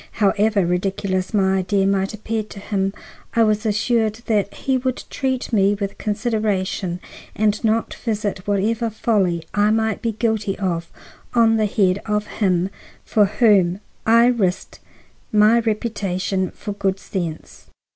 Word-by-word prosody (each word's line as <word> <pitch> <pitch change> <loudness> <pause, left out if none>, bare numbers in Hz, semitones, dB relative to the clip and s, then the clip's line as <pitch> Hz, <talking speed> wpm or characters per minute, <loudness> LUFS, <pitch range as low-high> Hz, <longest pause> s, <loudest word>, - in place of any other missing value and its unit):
However 205 -1 +2
ridiculous 185 +1 -1
my 190 -3 +2
idea 195 +1 +1
might 195 0 +1
appear 220 +1 -3
to 210 -1 -10
him, 195 -1 -1 0.4
I 230 - +5
was 215 0 +1
assured 220 +1 +1
that 205 -3 +1
he 265 - -1
would 255 0 -2
treat 260 -3 -2
me 200 -1 +4
with 200 -1 -5
consideration 205 -4 -1 0.4
and 210 0 +1
not 225 0 +1
visit 205 -4 -3
whatever 220 +3 +1
folly 195 -6 0
I 205 0 +3
might 220 -1 0
be 230 -2 -1
guilty 215 -3 -1
of 170 -4 -2 0.5
on 225 -1 +5
the 215 -1 +2
head 195 -2 +1
of 210 0 0
him 190 -3 0 0.3
for 210 -2 +3
whom 200 -4 +3 0.2
I 230 +1 +5
risked 215 -7 0 0.5
my 215 +2 +5
reputation 200 -4 -1
for 210 - -7
good 195 -1 -1
sense. 170 -5 -6
205 Hz, 140 wpm, -21 LUFS, 195-220 Hz, 0.5 s, I